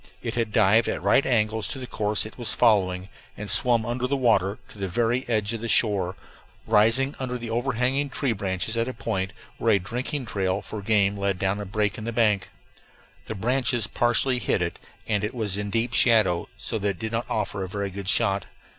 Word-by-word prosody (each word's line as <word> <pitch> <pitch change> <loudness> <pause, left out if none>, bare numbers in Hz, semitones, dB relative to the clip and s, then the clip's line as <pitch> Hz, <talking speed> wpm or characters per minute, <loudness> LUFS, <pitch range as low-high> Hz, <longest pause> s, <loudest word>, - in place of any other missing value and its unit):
It 115 -2 -3
had 115 -2 -1
dived 110 +2 +4
at - - -3
right 140 - +4
angles 110 -4 +1
to - - -5
the 130 - -6
course 105 -3 -1
it 110 - -9
was 120 -2 -4
following 95 -4 +2 0.3
and 105 0 -4
swum 120 -4 +4
under 120 +1 -1
water 115 -8 +2
to 105 - -14
the 95 - -2
very 120 +6 0
edge 110 -1 0
of 115 - -4
the 115 - -3
shore, 100 -5 +2 0.5
rising 120 +7 +3
under 125 -1 -3
the 115 -2 -6
overhanging 130 +3 0
tree 135 -1 -1
branches 95 +2 -2
at 115 +1 0
a 130 - -5
point 95 -4 -2 0.3
where 115 -1 +3
a - - +5
drinking 125 +8 -3
trail 95 -2 -1
for 110 - -6
game 100 -1 +2
led 100 -1 0
down 95 +2 0
a - - -5
break 105 +1 -1
in 110 - -6
the 115 - -2
bank. 110 -4 +2 0.8
The 110 - -4
branches 120 +2 +1
partially 120 +3 +1
hid 95 - +1
it, 85 - -4 0.3
and 105 -3 0
it 105 +4 -3
was 105 -5 -1
in 105 0 -3
deep 115 +3 -1
shadow, 105 -7 +4
so 110 - -3
that 100 0 0
it 95 - -4
did 110 -1 -4
not 115 +1 -2
offer 100 -2 -2
a - - -4
very 100 0 -3
good 95 0 -4
shot. 100 -4 +1
110 Hz, 210 wpm, -25 LUFS, 100-120 Hz, 0.8 s, a